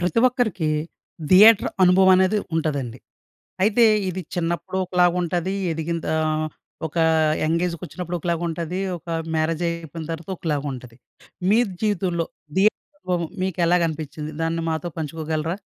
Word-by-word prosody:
ప్రతి 180 +5 +1
ఒక్కరికి 225 -10 -1 0.6
థియేటర్ 210 +3 +7
అనుభవం 185 +1 +6
అనేది 190 +3 +3 0.2
ఉంటదండి. 140 -7 -2 0.6
అయితే 215 +4 +4 0.2
ఇది 185 +1 -3
చిన్నప్పుడు 170 +1 -2
ఒకలాగ 180 -1 +3
ఉంటది, 175 +2 -1 0.2
ఎదిగిందా 160 0 -2 0.7
ఒక 160 - -12 0.5
యంగ్ 165 +2 +1
ఏజ్‌కొచ్చినప్పుడు 175 0 -5
ఒకలాగ 170 0 -1
ఉంటది, 170 +2 -3 0.2
ఒక - - -30 0.3
మ్యారేజైపోయిన 165 0 -2
తర్వాత 165 +3 -7
ఒకలాగ 150 -4 -2
ఉంటది. 125 -2 -10 0.5
మీ 215 - +5 0.2
జీవితంలో 180 -5 0 0.3
థియేటర్ 205 +3 +4 0.2
అనుభవం 180 - -2 0.2
మీకెలాగ 180 -1 +2
అనిపించింది? 155 0 -6
దాన్ని 165 0 -1
మాతో 160 +2 -3
పంచుకోగలరా? 160 +2 -3
170 Hz, 120 wpm, -23 LUFS, 160-185 Hz, 0.7 s, థియేటర్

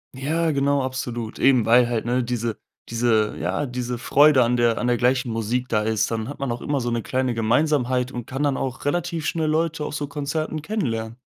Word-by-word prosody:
Ja, 160 +5 0
genau, 140 0 +1
absolut. 120 -3 -4
Eben 130 -5 +4
weil 120 +1 +5
halt, 115 -2 -1
ne, 125 +2 +1
diese 120 -2 -3 0.3
diese 115 -2 +1
ja, 145 - -1
diese 125 -1 -4
Freude 140 +1 +5
an 120 +1 +1
der 120 -1 +2
an 125 - -1
der 120 - +2
gleichen 125 0 +1
Musik 115 +3 -2
da 105 -2 +1
ist. 110 +1 0
Dann 110 -1 -2
hat 145 - -7
man 135 -3 -2
auch 120 - -4
immer 145 -3 -1
so 120 - -2
'ne 115 -1 -1
kleine 130 +1 -1
Gemeinsamkeit 125 +2 +1
und 120 -2 -6
kann 135 +3 -3
dann 140 -2 +1
auch 135 0 -4
relativ 170 +1 -1
schnell 160 -2 0
Leute 160 -1 0
auf - - -5
so 145 -1 -3
Konzerten 150 +2 -3
kennenlernen. 120 - -3
125 Hz, 215 wpm, -23 LUFS, 120-145 Hz, 0.3 s, weil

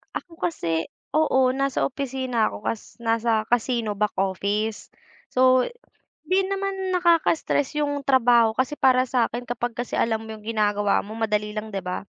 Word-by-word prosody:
Ako 330 -2 -7
kasi 165 - -1 0.2
oo, 265 -4 +3
nasa 275 0 0
opisina 260 -4 -1
ako, 205 - -7
cas 225 - -4
nasa 225 -1 +1
casino 235 -2 +1
back 210 -1 0
office. 200 +3 -1 0.4
So 255 0 +4 0.6
'di 375 +1 +2
naman 390 -1 -2
nakaka-stress 330 -5 +2
'yung 290 -1 0
trabaho 235 -4 +4
kasi 260 +3 -1
para 255 -1 +5
sa'kin 245 -1 -1
kapag 240 -1 -3
kasi 245 0 -3
alam 225 -1 0
mo 220 - -8
'yung 215 -1 -10
ginagawa 205 -2 +1
mo 210 - -10
madali 210 -1 0
lang 215 +1 -5
'di 195 - -3
ba? 180 +2 -5
240 Hz, 155 wpm, -24 LUFS, 215-275 Hz, 0.6 s, para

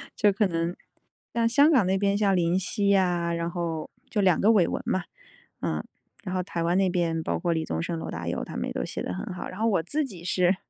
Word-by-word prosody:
就 210 - +4
可 205 +2 +2
能 170 0 -1 0.6
但 230 -1 +2
香 285 +6 +5
港 255 -9 +5
那 190 +1 +2
边， 200 0 +2
像 200 -2 +3
林 175 +1 +2
夕 200 +2 -1
呀， 175 -3 +2
然 170 0 -2
后 170 -3 -3 0.2
就 210 - 0
2 185 -4 +4
个 215 +3 +5
伟 195 -6 +4
文 - - -2
嘛。 185 - 0 0.6
嗯， - - -2 0.4
然 185 - -5
后 185 - 0
台 170 -2 -3
湾 175 +2 +2
那 195 -1 +3
边， 170 -2 0
包 - - -1
括 175 - 0
李 160 -1 0
宗 - - -2
盛、 170 0 -3
罗 - - -5
大 85 +1 -4
佑 85 - -2
他 - - -8
们 - - -2
也 - - -3
都 - - -2
写 - - -4
得 - - -4
很 90 - -5
好。 - - -6
然 185 - -8
后 225 - +1
我 195 -7 +2
自 300 - -1
己 185 -10 -9
是， 180 +1 +2
180 Hz, 270 characters per minute, -26 LUFS, 170-200 Hz, 0.6 s, 香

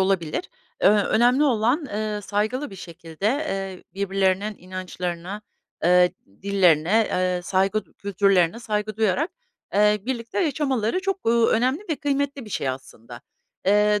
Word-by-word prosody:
olabilir. 190 - 0 0.3
Ööö, 205 0 +5
önemli 245 +5 +3
olan, 255 +4 +2
eee, 210 -1 -3
saygılı 215 +8 -2
bir 195 - -10
şekilde, 170 0 -6
eee, 195 -8 -2
birbirlerinin 195 +1 0
inançlarına, 180 +1 -5 0.4
eee, 180 0 +5 0.3
dillerine, 195 +1 +3
eee, 180 -1 0
saygı 195 +3 +1
d - - -27
kültürlerine 195 -1 +1
saygı 215 -2 -3
duyarak, 225 - +1 0.4
eee, 210 +1 +4
birlikte 240 +5 -2
yaşamaları 280 - 0
çok, 390 -6 -3
uuu, 230 0 +4
önemli 255 - +1
ve 310 - 0
kıymetli 280 -2 -2
bir 210 - -12
şey 135 - -2
aslında. 120 -2 -8 0.5
Eee, 210 +1 +4
210 Hz, 135 wpm, -24 LUFS, 185-235 Hz, 0.5 s, Ööö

